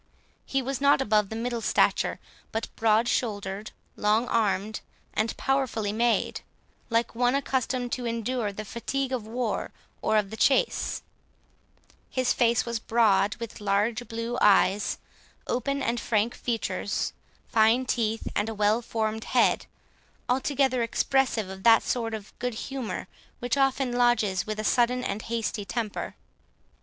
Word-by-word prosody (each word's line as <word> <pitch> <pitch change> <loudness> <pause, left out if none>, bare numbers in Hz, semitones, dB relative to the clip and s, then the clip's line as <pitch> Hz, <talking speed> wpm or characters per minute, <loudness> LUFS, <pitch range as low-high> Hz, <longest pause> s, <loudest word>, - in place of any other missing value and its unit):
He 270 -1 0
was 270 +1 -3
not 280 -1 +5
above 210 -5 +2
the 220 - -5
middle 235 +1 -2
stature, - - +2 0.3
but 225 - -4
broad 225 +1 +3
shouldered, 205 -4 -2 0.3
long 215 +3 +2
armed, 210 -1 0 0.3
and 220 +1 -1
powerfully 250 -6 0
made, 235 +1 +1 0.5
like 230 0 +1
one 245 +2 +2
accustomed 255 -2 -1
to 245 -2 -2
endure 230 -1 -1
the 215 +2 -7
fatigue 265 +5 -3
of 240 -5 -3
war 235 0 -2 0.3
or 220 - +2
of 205 -1 0
the 220 - -6
chase; 460 - +2 1.1
his 255 -1 +1
face 235 -1 +2
was 235 -1 -2
broad, 215 -3 +3
with 230 -2 -8
large 210 +4 0
blue 230 +2 -3
eyes, 200 0 +4 0.5
open 275 +3 -1
and 235 +1 0
frank 225 +1 +1
features, 235 -2 -2 0.3
fine 225 +3 +4
teeth, 225 -3 -1
and 215 - 0
a 225 - -5
well 210 +3 +2
formed 220 -1 -2
head, - - +2 0.6
altogether 260 0 +1
expressive 235 -2 +1
of 190 0 -8
that 225 +2 +6
sort 230 -2 -1
of 210 -1 -9
good 245 -2 -2
humour 265 0 -4 0.3
which 245 +1 -1
often 270 -2 +2
lodges 230 -6 +2
with 215 0 -3
a - - -2
sudden 245 +2 +2
and 205 -1 -2
hasty 225 -2 -2
temper. 210 +2 -4
230 Hz, 145 wpm, -27 LUFS, 215-250 Hz, 1.1 s, that